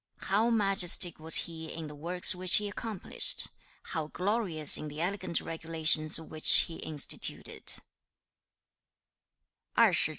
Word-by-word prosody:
2. - - -11
'How 215 +4 0
majestic 195 -6 +2
was 160 +1 +1
he 160 -1 -10
in 165 - -9
the 150 - -11
works 170 +5 +1
which 185 0 +1
he 210 -1 -2
accomplished! 210 -1 0 0.3
How 160 -2 -6
glorious 180 -4 -1
in 155 - -5
the 150 +1 -10
elegant 180 -1 -4
regulations 160 -1 0
which 155 -1 +6
he 165 - -8
instituted!' 150 -3 -1
165 Hz, 120 wpm, -27 LUFS, 155-195 Hz, 0.3 s, which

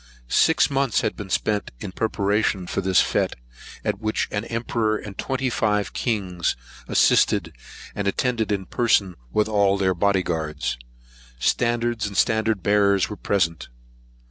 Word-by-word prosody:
Six 160 -2 +3
months 135 -4 +1
had - - -1
been 100 -2 -8
spent 105 +1 0
in - - -6
preparations 100 -3 0
for - - -1
this 95 -1 +4
fête, - - 0 0.5
at - - -1
which 110 0 -1
an 105 +1 -2
emperor 115 -2 -1
and 105 -2 -9
twenty 135 +4 -2
five 105 -6 0
kings 95 -8 -1 0.3
assisted - - +3 0.4
and 100 -1 -3
attended 115 +1 0
in 100 -2 -1
person 105 -4 +1 0.2
with 105 - +2
all 100 -2 +2
their 95 -1 +2
body 95 +1 +1
guards, 75 -6 -3 0.6
standards, 120 - 0
and 100 - -6
standard 110 -3 +1
bearers, 100 -1 +3
were 105 - -5
present. 85 -6 -1
105 Hz, 145 wpm, -23 LUFS, 95-110 Hz, 0.6 s, this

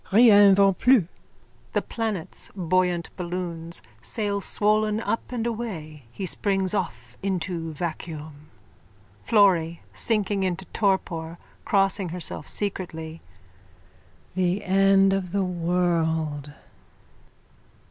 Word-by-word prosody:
Rien 205 -2 +7
va 195 0 +5
plus! 250 +3 +4 0.7
(The - - +2
planets, 220 -7 -4
buoyant 180 -1 0
balloons, 170 - -4 0.2
sail 205 - -1
swollen 215 +1 +1
up 230 +1 -3
and 235 -2 -2
away. 175 - -5
He 195 - -5
springs 195 0 0
off 125 - -3
into 175 -3 -2
vacuum.)_ 155 -2 -6 0.8
FLORRY: 175 -6 +3
(Sinking 205 -3 0
into 190 0 -2
torpor, 175 -5 0 0.3
crossing 195 -2 +2
herself 165 -3 -4
secretly.) 165 -5 -4 1.1
The 185 +2 0
end 195 +1 +4
of 190 -2 -2
the 200 -1 +2
world! 165 -4 0
185 Hz, 95 wpm, -25 LUFS, 165-200 Hz, 1.1 s, Rien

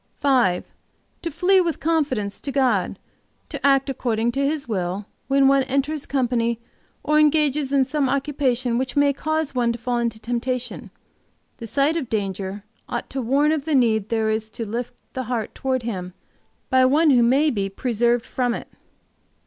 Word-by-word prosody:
"5. 250 -11 +2 0.6
To 335 - -3
flee, 365 +4 +3
with 335 -3 -1
confidence, 280 -11 -1
to 280 - -4
God, 250 -9 +1 0.5
to - - -7
act 275 -1 +4
according 235 -3 0
to 275 +3 -1
His 290 -1 -1
will, 190 -2 -2 0.2
when 275 0 +4
one 275 0 +5
enters 280 +2 -1
company, 235 -3 0 0.4
or 300 +1 +3
engages 300 -2 +2
in 275 -2 +3
some 285 -1 0
occupation 260 -3 0
which 260 -1 -3
may 285 0 +4
cause 315 +1 -1
one 240 -2 +1
to - - -6
fall 240 +1 -1
into 230 -2 -2
temptation. 245 +2 -3 0.7
The 230 - -7
sight 285 +7 +1
of 275 -7 -4
danger 195 -1 -3 0.3
ought - - -4
to 270 - -2
warn 280 +5 +2
of 305 -3 -1
the 315 -2 +1
need 220 -5 +2
there 220 -1 +1
is 220 0 -2
to 225 +2 -5
lift 240 +3 -4 0.2
the 260 -1 -3
heart 230 -2 -3
toward 260 -2 -1
Him 185 -5 -5 0.6
by 260 0 +5
one 295 +4 +4
who 245 -3 +5
may 270 +6 +4
be 200 -3 -2
preserved 235 +3 0
from 245 -2 -1
it." - - -8
255 Hz, 175 wpm, -23 LUFS, 230-280 Hz, 0.7 s, one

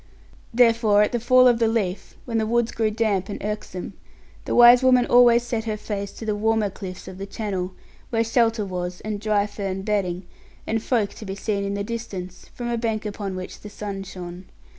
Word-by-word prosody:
Therefore, 230 -3 +4
at - - 0
the 240 - 0
fall 255 +2 +5
of 240 -2 +4
the 230 - +3
leaf, 210 -5 -2
when 230 -2 -1
the 220 - 0
woods 235 0 +1
grew 220 -1 0
damp 210 -3 0
and 205 - -4
irksome, 210 -3 -5 0.5
the - - -1
wise 240 +1 +8
woman 255 -1 +5
always 240 -1 +6
set 230 -2 -3
her 215 -1 -2
face 200 -1 -4
to 225 - -8
the 215 -1 0
warmer 220 -1 +1
cliffs 185 -2 -8
of 185 0 -9
the 195 - -5
Channel; 190 -4 -4 0.4
where 225 -1 +1
shelter 225 -2 +1
was, 180 -1 -4
and 210 -1 -4
dry 210 -2 +2
fern 195 -2 -4
bedding, 190 -3 -1 0.4
and 225 0 -1
folk 225 -4 0
to - - -11
be 195 -2 -5
seen 200 0 -2
in 200 0 -2
the 200 - -2
distance, 200 -5 -6
from 240 - -4
a 235 -1 -1
bank 225 -2 -2
upon 200 -2 -4
which 185 0 -7
the 210 - -10
sun 205 -1 -6
shone. 180 -1 -8
210 Hz, 205 wpm, -23 LUFS, 195-230 Hz, 0.5 s, wise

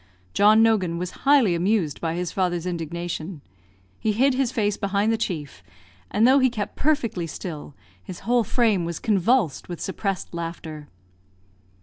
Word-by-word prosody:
John 215 +2 +6
Nogan 190 -7 +2
was 180 0 -4 0.2
highly 265 -11 +5
amused 175 -3 0
by 165 -1 -1
his 175 -1 -3
father's 175 -3 -1
indignation. 170 -1 -4 0.6
He 215 - 0
hid 265 +5 +3
his 255 -2 0
face 205 -4 0
behind 200 +1 0
the - - +2
chief; 160 - -4 0.5
and 225 +3 +3
though 270 +2 +6
he 260 -1 +4
kept 215 -4 -5
perfectly 230 - 0
still, 150 -3 -7 0.3
his 180 - -9
whole 240 +3 +2
frame 215 -4 +1
was 170 -1 -3
convulsed 210 - +1
with 175 - -5
suppressed 195 -1 -3
laughter. 165 -3 -6
190 Hz, 150 wpm, -24 LUFS, 170-225 Hz, 0.6 s, John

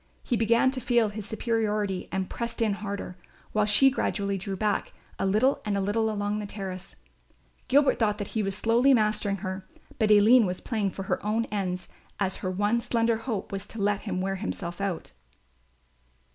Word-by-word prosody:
He 245 - 0
began 230 +3 +3
to 260 -1 -4
feel 240 -2 +2
his 210 0 -7
superiority 215 -4 -1
and 190 0 -1
pressed 235 0 -5
in 220 -3 +2
harder, 200 -3 -5 0.3
while 210 -1 +2
she 265 +6 +6
gradually 200 -6 -1
drew 195 +1 -4
back 205 +1 -1 0.3
a - - +1
little 215 +8 +2
and 205 -1 -1
a - - +1
little 215 +3 +1
along 205 0 -1
the 210 - -5
terrace. 190 -2 -7 0.7
Gilbert 280 +2 +4
thought 210 -3 +2
that 205 -2 -5
he 220 - -1
was 195 -1 -2
slowly 240 +4 +4
mastering 215 -2 +1
her; 190 0 -5 0.3
but 215 - +3
Aline 215 +2 +6
was 180 0 -3
playing 215 -4 -1
for 195 - -6
her - - -2
own 220 +2 0
ends 185 -3 -2 0.3
as 190 -2 0
her 185 - -3
one 205 +5 +1
slender 230 -1 +1
hope 225 -4 -4
was 195 +1 -5
to 225 - -8
let 205 0 +1
him 190 -4 -3
wear 195 +1 -1
himself 180 -3 -5
out. 190 - -3
210 Hz, 185 wpm, -27 LUFS, 195-225 Hz, 0.7 s, she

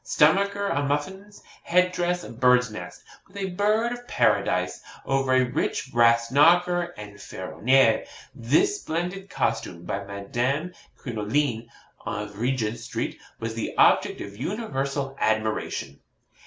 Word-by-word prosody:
Stomacher 200 +6 +3
a 145 -7 0
muffin. 165 +9 -3 0.3
Head 180 +1 +2
dress 175 0 -1
a - - -9
bird's 125 0 +3
nest, 110 - -9 0.2
with 190 - -14
a 195 -1 -3
bird 215 +5 +1
of 245 0 -7
paradise, - - +1 0.2
over 135 -1 +1
a 130 0 +5
rich 130 +1 -2
brass 115 0 +4
knocker 175 +4 +4
en 105 -1 -9
ferroniere. 115 +6 +1 0.3
This 145 - +1
splendid 180 +4 -4
costume, 85 - -2
by 100 +3 -3
Madame 120 - -2 0.2
Crinoline, 115 +1 -2 0.3
of 105 0 -5
Regent 120 -2 -1
Street, - - -4 0.2
was 115 0 -4
the 115 - -4
object - - +4
of 100 0 -8
universal 140 - -3
admiration.' 110 -10 -1
135 Hz, 130 wpm, -25 LUFS, 115-180 Hz, 0.3 s, a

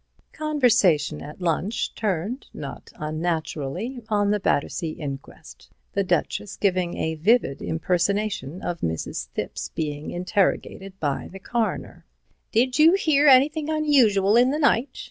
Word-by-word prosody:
Conversation 235 - +2
at 150 +5 -10
lunch 180 +6 -1
turned, 210 - -2
not - - -8
unnaturally, 160 - -3
on 205 -1 +2
the 210 - +1
Battersea 160 -1 -1
inquest, 140 -3 -9 0.2
the - - +1
Duchess 105 - -1
giving 185 -3 0
a 160 - -1
vivid 160 - +2
impersonation 180 -1 -1
of 175 -1 -3
Mrs. 80 -6 -3
Thipps - - -4
being 150 -1 -3
interrogated 190 +1 -1
by 145 -3 -2
the 195 - -9
Coroner. 230 +3 -3 0.2
" - - -43
'Did 250 +5 +2
you 320 +3 +7
hear 305 -6 +3
anything 290 +3 +5
unusual 245 -11 +3
in 245 +2 +5
the 290 - 0
night?' 275 -3 +2
195 Hz, 130 wpm, -24 LUFS, 160-250 Hz, 0.2 s, you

